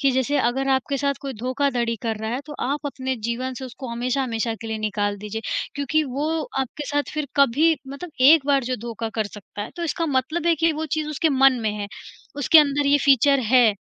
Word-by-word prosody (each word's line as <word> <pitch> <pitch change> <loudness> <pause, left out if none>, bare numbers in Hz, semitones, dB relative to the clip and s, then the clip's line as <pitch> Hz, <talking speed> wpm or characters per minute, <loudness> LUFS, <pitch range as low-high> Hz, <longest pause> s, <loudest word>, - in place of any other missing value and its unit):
कि 275 -1 +3
जैसे 260 +3 +1
अगर 265 +2 0
आपके 265 +1 0
साथ 280 +1 0
कोई 275 -2 -5
धोखाधड़ी 250 -2 0
कर 225 -2 -1
रहा 220 - -3
है 250 +3 -2
तो 300 - -8
आप 290 +2 -2
अपने 260 -2 -3
जीवन 255 +2 -3
से 265 - -6
उसको 255 +1 -8
हमेशा-हमेशा 240 -1 -1
के 225 - -7
लिए 220 -1 -3
निकाल 205 -1 -1
दीजिए, 210 +2 -5 0.3
क्योंकि 285 +2 +1
वो 280 +3 -2 0.3
आपके 290 +3 -4
साथ 290 0 -1
फिर 305 -1 -2
कभी 280 +4 +4 0.2
मतलब 280 +5 -7 0.2
एक 310 -3 +5
बार 275 -3 +2
जो 255 +1 -2
धोखा 225 0 -4
कर 215 - 0
सकता 205 0 -8
है - - -7
तो 345 - -3
इसका 330 +1 -1
मतलब 310 +6 -1
है 335 - +5
कि 330 - +4
वो 315 +1 -3
चीज़ 305 -1 -2
उसके 305 +2 +1
मन 270 -3 +4
में 215 - +1
है, 205 -1 -5 0.5
उसके 300 +3 +6
अंदर 290 -1 +3
ये 290 +1 +4
फीचर 275 0 +5
है, 245 -4 +6
265 Hz, 220 wpm, -23 LUFS, 235-290 Hz, 0.5 s, उसके